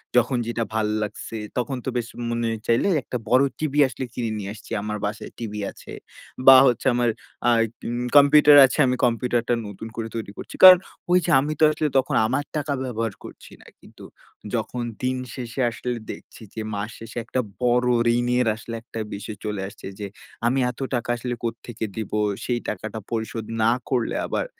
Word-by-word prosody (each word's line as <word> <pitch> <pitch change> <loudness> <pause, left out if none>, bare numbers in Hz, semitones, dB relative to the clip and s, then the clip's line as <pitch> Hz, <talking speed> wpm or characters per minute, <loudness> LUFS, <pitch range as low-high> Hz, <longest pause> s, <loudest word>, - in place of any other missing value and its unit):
যখন 125 +1 +3
যেটা 120 0 -1
ভাল 110 -1 +1 0.2
লাগছে, 105 +2 -6 0.2
তখন 125 +2 -1
তো - - -1
বেশ 120 -1 -2 0.2
মনে 115 -1 -1 0.2
চাইলে 115 +10 +3 0.2
একটা 125 - -4
বড় 130 +3 +5 0.2
TV 155 -3 -2
আসলে 130 +1 -5
কিনে 115 -3 -2
নিয়ে 100 -1 -5
আসছি 110 - -14
আমার 105 0 -3
বাসায় 105 +1 -5
TV 110 -3 -5 0.2
আছে। - - -13 0.6
বা 135 - +11
হচ্ছে 125 +1 0
আমার 120 0 +2 0.4
আ - - +6 0.4
উম 120 +1 -2
computer 145 +1 +7
আছে 130 - -2
আমি 125 - +1
computer-টা 120 0 0
নতুন 100 +2 -8
করে 115 -1 -3
তৈরি 110 -3 -4
করছি। - - -8
কারণ 185 -1 +12 0.3
ওই 180 - +6
যে 175 - 0
আমি 150 +3 -1
তো - - +3
আসলে 155 0 -1
তখন 135 - +1
আমার 130 +5 0
টাকা 145 -1 -1
ব্যবহার 115 -4 -3
করছি - - -12
না। - - -18
কিন্তু - - -16 0.5
যখন 120 +2 -3 0.2
দিন 130 0 0 0.2
শেষে 125 +1 -4
আসলে 125 +1 -4 0.2
দেখছি - - -12
যে 110 - -5
মাস 100 +2 -3
শেষে 115 +1 -10
একটা 130 - -2 0.2
বড় 125 0 +3 0.3
ঋণের 120 0 +1
আসলে 115 +1 -7
একটা 115 - -8
বিষয় 105 +1 -6
চলে 105 -2 -3
আসছে 100 - -12
যে 100 - -4 0.4
আমি 125 +3 +2
এত 125 - -18 0.2
টাকা 120 -1 -3
আসলে 120 +1 -4
কোত্থেকে 115 0 -4
দিব? 110 - -4 0.3
সেই 120 -1 0
টাকাটা 110 +2 -5
পরিশোধ 110 -1 -3 0.2
না 115 - +5 0.2
করলে 125 -4 0
আবার - - -2
120 Hz, 185 wpm, -23 LUFS, 110-125 Hz, 0.6 s, কারণ